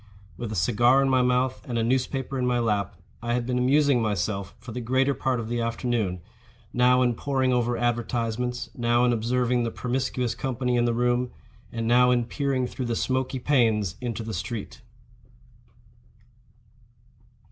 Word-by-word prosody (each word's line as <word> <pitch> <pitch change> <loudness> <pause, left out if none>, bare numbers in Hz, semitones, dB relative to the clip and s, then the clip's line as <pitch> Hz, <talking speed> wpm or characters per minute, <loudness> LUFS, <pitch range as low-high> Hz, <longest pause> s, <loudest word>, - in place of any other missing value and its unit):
With 110 +4 -5
a - - -3
cigar 120 +8 +3
in 135 - +1
my 130 -1 +3
mouth 125 +1 +1
and 120 - -1
a 115 - +1
newspaper 130 +2 -1
in 125 - 0
my 125 0 +2
lap, 105 -4 0 0.3
I 120 +1 -1
had 120 -1 -1
been 125 0 -1
amusing 140 0 +3
myself 100 -2 -2
for 125 - -10
the 125 +2 -4
greater 130 +4 +2
part 130 -2 -1
of 110 - -4
the 120 0 -2
afternoon, 115 -5 -1 0.5
now 125 +1 +4
in 120 -1 +2
poring 130 +1 0
over 120 -1 +1
advertisements, 120 0 -2
now 120 0 +2
in 120 - +3
observing 120 +2 +1
the 115 - -1
promiscuous 125 0 -2
company 125 -1 -2
in 120 0 +2
the 120 -1 +1
room, 120 +1 +1 0.4
and 115 -1 -3
now 125 +1 +5
in 120 -1 +2
peering 135 +1 -1
through 125 +1 -5
the 115 - -1
smoky 130 +2 -1
panes 115 -8 +2
into 120 -2 -3
the 110 0 -5
street. 105 +7 -5
120 Hz, 170 wpm, -26 LUFS, 115-125 Hz, 0.5 s, now